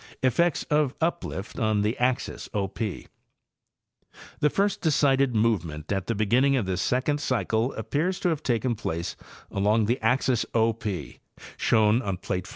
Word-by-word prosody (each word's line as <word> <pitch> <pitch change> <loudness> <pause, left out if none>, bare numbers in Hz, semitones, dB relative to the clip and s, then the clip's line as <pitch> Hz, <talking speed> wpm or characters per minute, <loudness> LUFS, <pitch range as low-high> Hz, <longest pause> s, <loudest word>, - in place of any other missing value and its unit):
Effects 160 +6 +2
of 150 -3 +1
Uplift 160 - -3
on 110 -2 +1
the 110 +2 0
Axis 125 +1 -1
O 100 -2 +1
P.—The 100 +1 -5 1.4
first 200 +6 0
decided 135 -5 +3
movement 85 -9 0
at 95 -2 -1
the 115 - 0
beginning 125 +7 +3
of 120 -6 0
this 95 0 -1
second 145 +4 0
cycle 120 -2 0
appears 175 +6 -1
to 180 - +2
have 160 -3 -1
taken 120 -2 0
place 85 -6 -4 0.4
along 105 +3 +2
the 120 +5 0
axis 125 +1 +2
O 115 0 +3
P, 105 -4 -5 0.4
shown 110 +2 +3
on 100 -6 -3
plate 90 0 -3
5. - - -11
115 Hz, 155 wpm, -26 LUFS, 105-135 Hz, 1.4 s, decided